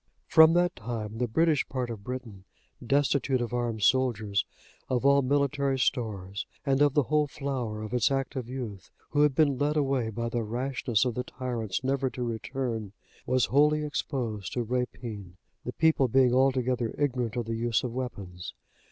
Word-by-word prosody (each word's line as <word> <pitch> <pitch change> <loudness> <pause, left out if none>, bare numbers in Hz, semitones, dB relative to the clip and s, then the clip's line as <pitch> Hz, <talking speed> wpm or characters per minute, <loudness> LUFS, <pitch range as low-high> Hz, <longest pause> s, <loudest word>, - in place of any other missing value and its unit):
From 160 0 +7
that 175 +1 +2
time, 110 -1 -5
the 125 - +1
British 155 +4 +2
part 125 -2 -3
of 105 -3 -7
Britain, 120 -5 -7 0.4
destitute 140 0 +2
of 120 0 -3
armed 120 -3 -1
soldiers, 110 -6 +2 0.4
of 130 0 0
all 140 0 +6
military 140 0 +1
stores, 105 -6 -2 0.2
and 135 0 +2
of 145 -2 +4
the 145 - +4
whole 150 +3 +1
flower 130 -7 -4
of 110 - -6
its 125 -3 +3
active 135 -2 -2
youth, 115 -8 -6 0.2
who 145 - +2
had 150 -3 +4
been 140 -4 +3
led 150 +2 +1
away 135 -5 +1
by 115 +2 -3
the 115 0 -1
rashness 120 +1 -1
of 125 - 0
the 125 - -3
tyrants 120 -5 -4
never 135 0 0
to 125 - -5
return, 115 -2 -3 0.3
was 130 -2 +3
wholly 150 +2 +3
exposed 120 -8 -3
to 120 - -1
rapine, 115 -6 -4 0.3
the 125 - -4
people 160 -4 +3
being 125 0 +4
altogether 130 -2 +1
ignorant 125 -5 -1
of 120 -2 -2
the 115 - -3
use 115 0 0
of 125 -2 -3
weapons. 100 -9 -6
125 Hz, 170 wpm, -28 LUFS, 115-135 Hz, 0.4 s, From